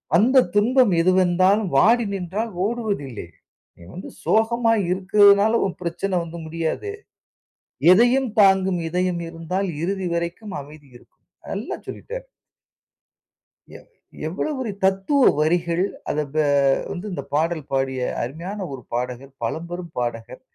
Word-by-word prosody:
வந்த 250 Hz, +8 st, +5 dB
துன்பம் 235 Hz, 0 st, +4 dB
எதுவந்தாலும் 185 Hz, +3 st, +3 dB
வாடி 230 Hz, -, +4 dB
நின்றால் 195 Hz, +4 st, -3 dB
ஓடுவதில்லை. 200 Hz, -, -3 dB, 0.5 s
நீ -, -, -16 dB
வந்து 185 Hz, -, -8 dB
சோகமாய் 225 Hz, -1 st, +2 dB
இருக்றதுனால 200 Hz, +3 st, +5 dB
உன் 190 Hz, -, -4 dB
பிரச்சன 180 Hz, +2 st, -2 dB
வந்து 170 Hz, 0 st, -8 dB
முடியாது. 165 Hz, -, -3 dB, 1.0 s
எதையும் 245 Hz, +6 st, +4 dB
தாங்கும் 190 Hz, -2 st, +4 dB
இதயம் 180 Hz, +1 st, -1 dB
இருந்தால் 165 Hz, +4 st, -3 dB
இறுதி 190 Hz, +1 st, -2 dB
வரைக்கும் 170 Hz, +5 st, -4 dB
அமைதி 145 Hz, 0 st, -15 dB
இருக்கும். -, -, -22 dB, 0.2 s
நல்லா -, -, -4 dB
சொல்லிட்டாரு. -, -, -7 dB, 1.5 s
எ -, -, -10 dB, 0.5 s
எவ்ளோ 185 Hz, -, -3 dB
பெரிய 240 Hz, -6 st, -4 dB
தத்துவ 195 Hz, +9 st, +3 dB
வரிகள். 170 Hz, +2 st, +1 dB, 0.3 s
அத 150 Hz, -, -1 dB
பே 155 Hz, 0 st, +2 dB, 0.5 s
வந்து 180 Hz, +4 st, -5 dB
இந்த 140 Hz, -, -4 dB
பாடல் 160 Hz, +1 st, 0 dB
பாடிய 135 Hz, -1 st, -1 dB, 0.2 s
அருமையான 170 Hz, -, -5 dB
ஒரு 130 Hz, -2 st, -7 dB
பாடகர் 125 Hz, +2 st, -4 dB
பழம்பெரும் 170 Hz, +7 st, -5 dB
பாடகர். 120 Hz, +1 st, -4 dB
185 Hz, 115 wpm, -22 LUFS, 160-210 Hz, 1.5 s, வந்த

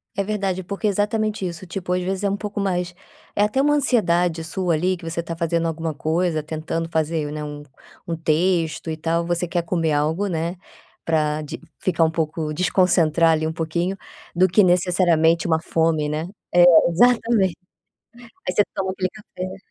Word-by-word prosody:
É 200 Hz, -, 0 dB
verdade, 195 Hz, -2 st, -2 dB
porque 200 Hz, +4 st, -5 dB
é 210 Hz, -, +4 dB
exatamente 210 Hz, +1 st, -1 dB
isso, 175 Hz, 0 st, -5 dB
tipo 185 Hz, 0 st, -5 dB
às 180 Hz, 0 st, +1 dB
vezes 190 Hz, +2 st, -3 dB
é 200 Hz, -, +2 dB
um 200 Hz, -, -1 dB
pouco 205 Hz, 0 st, -5 dB
mais 180 Hz, -3 st, -1 dB, 0.4 s
é -, -, +1 dB
até 210 Hz, +5 st, +1 dB
uma 295 Hz, +2 st, +3 dB
ansiedade 180 Hz, -, +1 dB
sua 170 Hz, +1 st, -1 dB
ali 180 Hz, +4 st, +1 dB
que 175 Hz, -, -14 dB
você 170 Hz, +1 st, -3 dB
tá 165 Hz, 0 st, -5 dB
fazendo 165 Hz, 0 st, 0 dB
alguma 165 Hz, 0 st, -3 dB
coisa, 160 Hz, +2 st, -1 dB
tentando 160 Hz, +1 st, -3 dB
fazer, 160 Hz, -2 st, -1 dB
né, 150 Hz, 0 st, -5 dB
um 145 Hz, 0 st, -7 dB, 0.4 s
um 170 Hz, -, -2 dB
texto 165 Hz, 0 st, 0 dB
e 155 Hz, -, -4 dB
tal, 165 Hz, +1 st, -1 dB
você 175 Hz, +1 st, 0 dB
quer 170 Hz, 0 st, -1 dB
comer 165 Hz, -2 st, 0 dB
algo, 155 Hz, +7 st, 0 dB
né, 170 Hz, -1 st, -2 dB, 0.5 s
pra 155 Hz, -2 st, 0 dB
de 150 Hz, -, -7 dB, 0.2 s
ficar 170 Hz, -3 st, +1 dB
um 160 Hz, -, +2 dB
pouco, 155 Hz, -1 st, -2 dB
desconcentrar 170 Hz, -2 st, +3 dB
ali 160 Hz, 0 st, +1 dB
um 160 Hz, -, -3 dB
pouquinho, 170 Hz, +4 st, -2 dB, 0.4 s
do 185 Hz, +2 st, +5 dB
que 190 Hz, +4 st, +4 dB
necessariamente 175 Hz, -2 st, +3 dB
uma 160 Hz, -1 st, +2 dB
fome, 160 Hz, -2 st, 0 dB
né, 155 Hz, +2 st, -3 dB, 0.3 s
é 175 Hz, 0 st, +7 dB, 0.3 s
exatamente, 225 Hz, -2 st, +3 dB, 0.9 s
aí 180 Hz, -, -1 dB
você 205 Hz, -, +4 dB
toma 190 Hz, -2 st, -1 dB
aquele 185 Hz, -1 st, -2 dB
café. 185 Hz, -2 st, -8 dB
170 Hz, 185 wpm, -22 LUFS, 160-190 Hz, 0.9 s, é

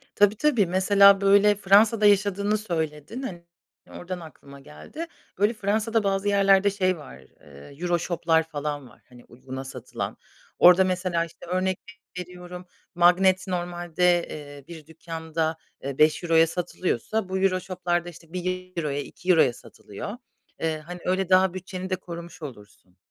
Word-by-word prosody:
Tabii, 205 Hz, +1 st, +4 dB
tabii. 245 Hz, -6 st, +2 dB
Mesela 195 Hz, +2 st, +5 dB
böyle 200 Hz, +1 st, +5 dB
Fransa'da 210 Hz, +2 st, +4 dB
yaşadığını 205 Hz, +1 st, +3 dB
söyledin. 165 Hz, -, -4 dB
Hani, 175 Hz, -10 st, -7 dB, 0.5 s
oradan 180 Hz, 0 st, -7 dB
aklıma 140 Hz, -3 st, -13 dB
geldi. 135 Hz, -, -9 dB, 0.3 s
Böyle 205 Hz, +4 st, +2 dB
Fransa'da 220 Hz, +1 st, 0 dB
bazı 195 Hz, 0 st, 0 dB
yerlerde, 200 Hz, 0 st, +4 dB
şey, 185 Hz, -2 st, 0 dB
var, 145 Hz, -, -12 dB
eee, 70 Hz, -, -16 dB
EuroShop'lar 170 Hz, -2 st, +1 dB
falan 145 Hz, -3 st, -4 dB
var, -, -, -21 dB
hani, 125 Hz, -1 st, -16 dB
uyguna 130 Hz, +2 st, -9 dB
satılan. 130 Hz, -2 st, -6 dB, 0.4 s
Orada 180 Hz, +1 st, +8 dB
mesela 180 Hz, -2 st, -1 dB
işte 170 Hz, -, -14 dB
örnek 185 Hz, +1 st, -1 dB, 0.4 s
veriyorum 180 Hz, 0 st, -9 dB, 0.3 s
magnet 185 Hz, +2 st, +4 dB
normalde, 175 Hz, -1 st, 0 dB
eee, 145 Hz, -2 st, -9 dB
bir 160 Hz, -3 st, -11 dB
dükkanda, 160 Hz, 0 st, -4 dB, 0.3 s
eee, 135 Hz, 0 st, -5 dB
€5'ya 165 Hz, +1 st, +4 dB
satılıyorsa, 180 Hz, -, -2 dB
bu 190 Hz, -, -1 dB
EuroShop'larda 180 Hz, -2 st, -1 dB
işte 165 Hz, 0 st, -16 dB
€1'ya, 180 Hz, -5 st, -3 dB
€2'ya 165 Hz, -2 st, +2 dB
satılıyor. 120 Hz, -, -9 dB, 0.4 s
Eee, 160 Hz, -1 st, -1 dB
hani, 175 Hz, +3 st, -9 dB
öyle 185 Hz, 0 st, 0 dB
daha 185 Hz, -1 st, +4 dB
bütçeni 185 Hz, 0 st, -6 dB
de 185 Hz, -, +1 dB
korumuş 170 Hz, -1 st, -10 dB
olursun. 105 Hz, -, -12 dB
180 Hz, 130 wpm, -25 LUFS, 160-195 Hz, 0.5 s, Orada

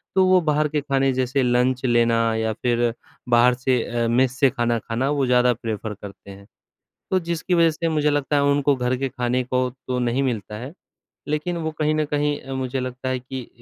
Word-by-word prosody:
तो 190 Hz, -, +5 dB
वो 185 Hz, 0 st, +5 dB
बाहर 150 Hz, -1 st, +1 dB
के 150 Hz, -1 st, -1 dB
खाने 135 Hz, -1 st, +1 dB
जैसे 130 Hz, +1 st, 0 dB
लंच 125 Hz, +1 st, +1 dB
लेना 120 Hz, -1 st, +3 dB, 0.2 s
या 110 Hz, 0 st, 0 dB
फ़िर 120 Hz, 0 st, 0 dB, 0.4 s
बाहर 120 Hz, +1 st, +5 dB
से 125 Hz, -1 st, 0 dB
अ, 120 Hz, -1 st, -1 dB
मेस 130 Hz, +2 st, +1 dB
से 135 Hz, -, +5 dB
खाना 120 Hz, -2 st, 0 dB
खाना 120 Hz, +6 st, -2 dB
वो 145 Hz, -2 st, +1 dB
ज़्यादा 125 Hz, 0 st, +3 dB
प्रेफर 110 Hz, -2 st, -5 dB
करते 100 Hz, 0 st, -11 dB
हैं। 100 Hz, 0 st, -13 dB, 0.7 s
तो 190 Hz, -, +3 dB
जिसकी 170 Hz, +1 st, -1 dB
वजह 165 Hz, -1 st, +5 dB
से 165 Hz, +2 st, -2 dB
मुझे 150 Hz, -2 st, +1 dB
लगता 145 Hz, 0 st, 0 dB
है 140 Hz, -, +3 dB
उनको 140 Hz, 0 st, +3 dB
घर 125 Hz, 0 st, 0 dB
के 135 Hz, +1 st, -2 dB
खाने 125 Hz, 0 st, -1 dB
को 125 Hz, 0 st, 0 dB, 0.2 s
तो 125 Hz, -1 st, -1 dB
नहीं 125 Hz, +2 st, 0 dB
मिलता 105 Hz, -5 st, -3 dB
है। 130 Hz, +5 st, -7 dB, 0.6 s
लेकिन 155 Hz, +4 st, -2 dB
वो 160 Hz, -1 st, -3 dB
कहीं 155 Hz, 0 st, +2 dB
न 155 Hz, -1 st, +1 dB
कहीं 145 Hz, 0 st, -1 dB
अ, 135 Hz, -, -7 dB
मुझे 130 Hz, 0 st, -2 dB
लगता 130 Hz, +1 st, -4 dB
है 130 Hz, -, -1 dB
कि 130 Hz, 0 st, -7 dB
अ -, -, -16 dB
130 Hz, 215 wpm, -22 LUFS, 120-145 Hz, 0.7 s, तो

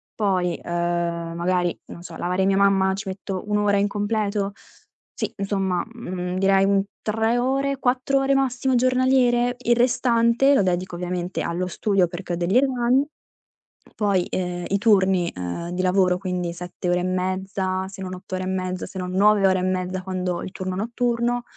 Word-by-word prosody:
Poi, 185 Hz, -4 st, 0 dB
uhm, 170 Hz, -1 st, -2 dB
magari, 175 Hz, 0 st, 0 dB
non 170 Hz, -, -11 dB
so, 170 Hz, -2 st, -9 dB
lavare 180 Hz, +2 st, 0 dB
mia 195 Hz, 0 st, +2 dB
mamma 195 Hz, -1 st, +3 dB
ci 195 Hz, +1 st, -6 dB
metto 190 Hz, 0 st, -5 dB
1 210 Hz, -, 0 dB
ora 205 Hz, -1 st, +2 dB
in 200 Hz, +1 st, +2 dB
completo? 205 Hz, -1 st, -1 dB, 0.6 s
Sì, -, -, -4 dB
insomma, 195 Hz, -3 st, -1 dB
mhmm, 180 Hz, -6 st, -4 dB
direi 195 Hz, 0 st, +4 dB
un 195 Hz, 0 st, +3 dB, 0.2 s
3 225 Hz, +2 st, 0 dB
ore, 270 Hz, +2 st, 0 dB
4 260 Hz, +2 st, +1 dB
ore 270 Hz, 0 st, +2 dB
massimo 265 Hz, -1 st, +1 dB
giornaliere, 250 Hz, -1 st, +3 dB
il 240 Hz, -1 st, +2 dB
restante 240 Hz, +1 st, +3 dB
lo -, -, +4 dB
dedico 180 Hz, 0 st, -1 dB
ovviamente 180 Hz, +1 st, -3 dB
allo 175 Hz, +2 st, -2 dB
studio 195 Hz, 0 st, +1 dB
perché 175 Hz, -, -5 dB
ho -, -, +1 dB
degli 175 Hz, +6 st, +1 dB
esami. 260 Hz, 0 st, +2 dB, 0.9 s
Poi, 200 Hz, -4 st, +1 dB
ehm, 180 Hz, -1 st, -3 dB
i 200 Hz, -, +2 dB
turni, 190 Hz, -5 st, +3 dB
uhm, 90 Hz, -, -4 dB
di 180 Hz, +1 st, -2 dB
lavoro, 185 Hz, -1 st, +3 dB
quindi 180 Hz, -2 st, -3 dB
7 180 Hz, +1 st, -5 dB
ore 175 Hz, 0 st, +2 dB
e -, -, -3 dB
mezza, 185 Hz, +1 st, -2 dB
se 190 Hz, 0 st, -10 dB
non 185 Hz, -1 st, -5 dB
8 180 Hz, +1 st, -11 dB
ore 185 Hz, -, -3 dB
e -, -, -4 dB
mezza, 185 Hz, -1 st, -2 dB
se -, -, -10 dB
non 180 Hz, 0 st, -4 dB
9 200 Hz, +1 st, +4 dB
ore 185 Hz, -1 st, +2 dB
e -, -, -2 dB
mezza 185 Hz, 0 st, -1 dB
quando 185 Hz, -1 st, -2 dB
ho -, -, -6 dB
il -, -, -6 dB
turno 185 Hz, -1 st, -4 dB
notturno. 235 Hz, +3 st, -1 dB
190 Hz, 180 wpm, -23 LUFS, 180-230 Hz, 0.9 s, direi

